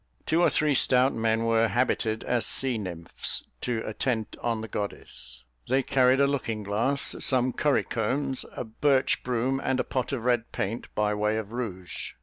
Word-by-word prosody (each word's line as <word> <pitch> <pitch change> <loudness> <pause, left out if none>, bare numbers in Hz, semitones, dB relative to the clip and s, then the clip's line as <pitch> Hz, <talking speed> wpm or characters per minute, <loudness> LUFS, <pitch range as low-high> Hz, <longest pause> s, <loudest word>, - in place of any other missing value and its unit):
Two 165 +2 +2
or - - +5
three 150 -2 +2
stout 130 0 +4
men 115 0 +1
were 115 0 +3
habited 115 -2 0
as 120 -2 0
sea 130 -4 +1
nymphs, 85 -4 -2 0.2
to 120 -3 -1
attend 110 0 -2
on 115 -2 -1
the 110 - -5
goddess: 60 - -6 0.3
they 130 +1 +3
carried 130 0 +3
a 140 - +5
looking 115 -6 -2
glass, 115 +8 +1
some 130 -1 +2
curry 145 -2 +2
combs, 130 +4 -1
a - - -3
birch 130 +4 +1
broom, 130 +2 0
and 130 -1 0
a - - +2
pot 130 0 -2
of 130 -5 -3
red 120 -2 +1
paint, 110 +4 -3
by 105 0 +1
way 105 +1 0
of 110 -1 -5
rouge. 100 -7 -5
120 Hz, 175 wpm, -27 LUFS, 110-130 Hz, 0.3 s, or